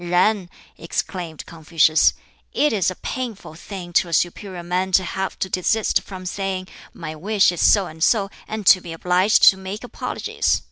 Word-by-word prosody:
"Yen!" 180 +2 +1 0.3
exclaimed 165 -1 -4
Confucius, 160 -1 +2 0.4
"it 300 -3 +2
is 195 -4 +1
a 185 - -5
painful 235 -9 -6
thing 175 +1 -9
to 175 - +3
a - - -6
superior 180 +1 -1
man 180 +2 -1
to 185 +1 +4
have 190 +2 -4
to - - -2
desist 195 +4 +1
from 185 -2 -10
saying, 190 0 -3 0.2
'My 155 -3 -7
wish 195 +5 +2
is 175 - -4
so 200 -3 +5
and 160 -1 -6
so,' 200 -2 +2 0.2
and 215 -1 -5
to 185 - +7
be 170 -2 -8
obliged 180 +5 +2
to 190 - -11
make 190 +3 -7
apologies. 245 - -2
185 Hz, 175 wpm, -21 LUFS, 175-200 Hz, 0.4 s, to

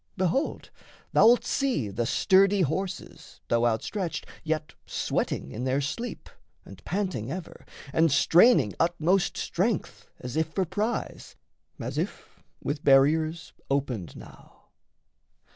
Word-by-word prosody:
Behold, 185 - -1 0.4
Thou'lt 240 +2 +5
see 255 - 0
the 115 +4 -2
sturdy 195 +6 +4
horses, 180 +4 -4
though 120 0 +3
outstretched, 165 - -2 0.2
Yet 155 -1 -2
sweating 65 - -2
in 120 - -5
their 130 +1 +1
sleep, 230 - -4 0.4
and - - -13
panting 180 - -3
ever, 180 +1 -8 0.3
And 165 -1 +3
straining 165 - +5
utmost 175 +2 +1
strength, 170 - -2
as 125 0 -7
if 160 0 +1
for 190 - +1
prize, 205 +7 -3 0.4
As - - -4
if, - - -6 0.2
with 145 +1 -3
barriers 155 +4 +3 0.2
opened 130 -9 -2
now... - - -15
160 Hz, 115 wpm, -27 LUFS, 135-190 Hz, 0.4 s, Thou'lt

